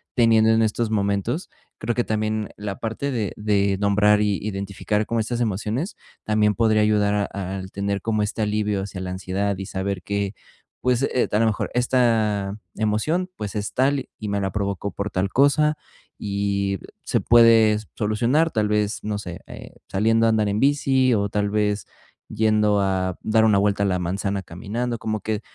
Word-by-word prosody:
teniendo 115 -2 +4
en 110 0 +3
estos 110 +1 0
momentos. 100 - -1 0.3
Creo 115 +1 -2
que 120 - +1
también 110 -1 -1
la 100 -1 -5
parte 115 +5 -3
de 110 -5 -2
de 100 -2 +1
nombrar 105 +1 +4
y 105 -2 +1
identificar 100 +1 -2
como 115 +1 0
estas 120 +2 -3
emociones, 110 - -2 0.3
también 105 -1 +2
podría 110 -2 +3
ayudar 105 -1 +2
a 95 -1 -4
al 95 0 -8
tener 100 0 -2
como 110 0 0
este 105 +2 -3
alivio 105 -1 0
hacia 95 -1 -7
la 90 -1 -4
ansiedad, 95 +2 -2
y 95 0 -6
saber 95 -2 -3
que, 100 -1 -2 0.5
pues, 125 0 +1
eh, 130 -2 +1
a 105 - +2
lo 115 - +3
mejor, 105 - -1
esta 110 -5 +1 0.2
emoción, 110 - 0
pues, 105 0 -5
es 105 0 -3
tal 135 +1 +1
y 110 - -5
me 100 0 -1
la 95 -1 -1
provocó 100 0 -2
por 100 +1 -4
tal 95 +1 0
cosa. 145 +5 +3 0.5
Y 100 -1 -1 0.2
se - - 0
puede 115 -2 +6 0.2
solucionar, 120 +9 +1
tal 110 -2 +1
vez, 105 0 0
no 105 -1 -1
sé, 90 -4 -7
eh, - - -11
saliendo 115 +3 +2
a - - +4
andar 110 -2 +2
en 100 - -1
bici, 135 -2 +3
o 100 -1 0
tal 100 0 0
vez, 105 0 0 0.4
yendo 105 -1 +2
a 95 -2 -1
dar 110 0 +3
una 105 -2 +4
vuelta 100 0 +2
a - - +2
la 90 -1 0
manzana 95 +2 -2
caminando, 115 +8 -4
como 110 -1 -3
que 110 -1 -2
105 Hz, 180 wpm, -23 LUFS, 100-115 Hz, 0.5 s, puede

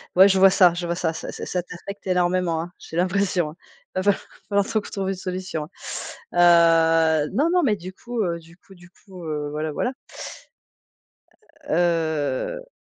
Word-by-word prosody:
Ouais, 190 +2 +8
je 190 -1 +3
vois 195 0 +8
ça 180 -2 +5
je 175 0 -4
vois 170 0 -1
ça. 165 -2 -1
Ça - - -6
ça - - -7
ça 180 -1 -2
t'affecte 195 +3 -9
énormément, 180 -2 +1
hein. 175 +2 -7
J'ai 160 - -10
l'impression, 180 -2 +1
hein. - - -15 0.4
Va 185 - 0
fal 205 0 +5 0.4
va 200 0 +3
falloir - - -12
qu'on 215 - +2
t - - -10
trouve 195 -1 -2
une 195 - -1
solution, 185 -3 -4 0.7
hein. 165 -2 +5
Heu, - - -6
non, 290 +10 +2
non, 360 -1 +3
mais 220 -6 +3
du 185 -1 -9
coup, 235 +4 -4
heu, 170 -2 -2
du 165 +1 -18
coup 195 +1 -18
du 175 0 -17
coup, 185 -2 -13
heu, 150 -2 -3
voilà, 155 +1 -3
voilà. 250 +11 -1 1.8
Heu. 165 - 0
175 Hz, 190 wpm, -23 LUFS, 165-195 Hz, 1.8 s, Ouais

